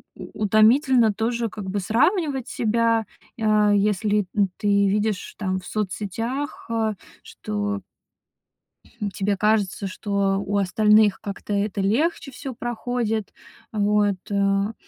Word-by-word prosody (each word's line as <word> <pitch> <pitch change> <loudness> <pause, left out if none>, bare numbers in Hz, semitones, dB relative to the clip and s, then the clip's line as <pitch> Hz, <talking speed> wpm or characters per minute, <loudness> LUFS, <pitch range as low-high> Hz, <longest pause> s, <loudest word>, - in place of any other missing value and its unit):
у 215 - -7
утомительно 225 +2 +4
тоже 230 +2 -1
как 205 -3 -7
бы 200 +2 -1
сравнивать 265 - +1
себя, 230 0 +1 0.4
а, 215 -1 +3
если 205 0 +1
н 200 -3 +2
ты 205 - -3 0.2
видишь, 210 -1 -1
там, 190 -2 -1
в 180 - -14
соцсетях, 220 - -3
а 225 -2 0 0.3
что 205 -1 -4 1.3
тебе 195 +1 -1
кажется, 205 -2 +1
что 200 0 -1
у 205 +1 -1
остальных 210 +2 +4
как-то 200 +1 -5
это 200 -1 -1
легче 275 - 0
всё 265 +1 -7
проходит 235 -3 -3 0.4
вот, 205 -1 +2
а. 200 +1 +1
210 Hz, 115 wpm, -23 LUFS, 200-230 Hz, 1.3 s, утомительно